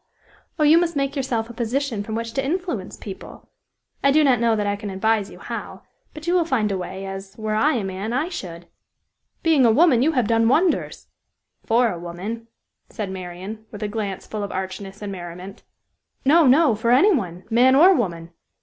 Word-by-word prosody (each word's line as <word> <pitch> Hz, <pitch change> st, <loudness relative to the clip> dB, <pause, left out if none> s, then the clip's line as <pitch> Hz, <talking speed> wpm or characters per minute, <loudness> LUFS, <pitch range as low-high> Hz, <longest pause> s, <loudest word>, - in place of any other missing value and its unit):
Oh, 305 Hz, -, +1 dB
you 310 Hz, +3 st, +6 dB
must 340 Hz, -2 st, -1 dB
make 275 Hz, 0 st, -1 dB
yourself 245 Hz, -5 st, -1 dB
a 235 Hz, -, -10 dB
position 235 Hz, 0 st, -2 dB
from 220 Hz, +2 st, -5 dB
which 230 Hz, 0 st, -4 dB
to 270 Hz, -, -1 dB
influence 310 Hz, -, -3 dB
people! 195 Hz, -3 st, -10 dB, 0.5 s
I 275 Hz, -, +5 dB
do 305 Hz, +2 st, +4 dB
not 260 Hz, -5 st, +4 dB
know 230 Hz, -1 st, +2 dB
that 210 Hz, -1 st, -1 dB
I 205 Hz, 0 st, 0 dB
can 205 Hz, 0 st, -7 dB
advise 205 Hz, +1 st, 0 dB
you -, -, -12 dB
how; -, -, -7 dB, 0.3 s
but 305 Hz, 0 st, -9 dB
you 345 Hz, -, +1 dB
will 360 Hz, -2 st, +4 dB
find 235 Hz, -10 st, 0 dB
a 195 Hz, -, -1 dB
way, 190 Hz, +2 st, -6 dB
as 195 Hz, 0 st, -8 dB
were 215 Hz, -1 st, -3 dB
I 275 Hz, +8 st, +2 dB
a 225 Hz, -, -1 dB
man, 195 Hz, +3 st, -4 dB
I 265 Hz, +7 st, 0 dB
should!" 175 Hz, -, -7 dB, 0.8 s
"Being 320 Hz, -5 st, +4 dB
a 235 Hz, -, +6 dB
woman, 275 Hz, -1 st, +4 dB
you 315 Hz, +5 st, +2 dB
have 250 Hz, -5 st, +2 dB
done 225 Hz, 0 st, +3 dB
wonders!" 335 Hz, +7 st, +1 dB, 0.6 s
"For 235 Hz, 0 st, +3 dB
a 175 Hz, -, -6 dB
woman," 190 Hz, +7 st, -6 dB, 0.4 s
said 205 Hz, -3 st, -5 dB
Marian, 190 Hz, +4 st, -8 dB
with 210 Hz, 0 st, -8 dB
a -, -, -1 dB
glance 205 Hz, -3 st, -4 dB
full 215 Hz, -, -5 dB
of 200 Hz, -, -4 dB
archness 190 Hz, +2 st, -6 dB
and 205 Hz, -, -4 dB
merriment. 180 Hz, +1 st, -8 dB, 0.6 s
"No, 310 Hz, +2 st, +5 dB
no; 280 Hz, +1 st, +5 dB
for 225 Hz, +2 st, -1 dB
any 340 Hz, -, +5 dB
one, 180 Hz, -, -3 dB
man 250 Hz, +3 st, +5 dB
or 355 Hz, +7 st, +7 dB
woman! 170 Hz, -, -2 dB
225 Hz, 205 wpm, -22 LUFS, 195-275 Hz, 0.8 s, or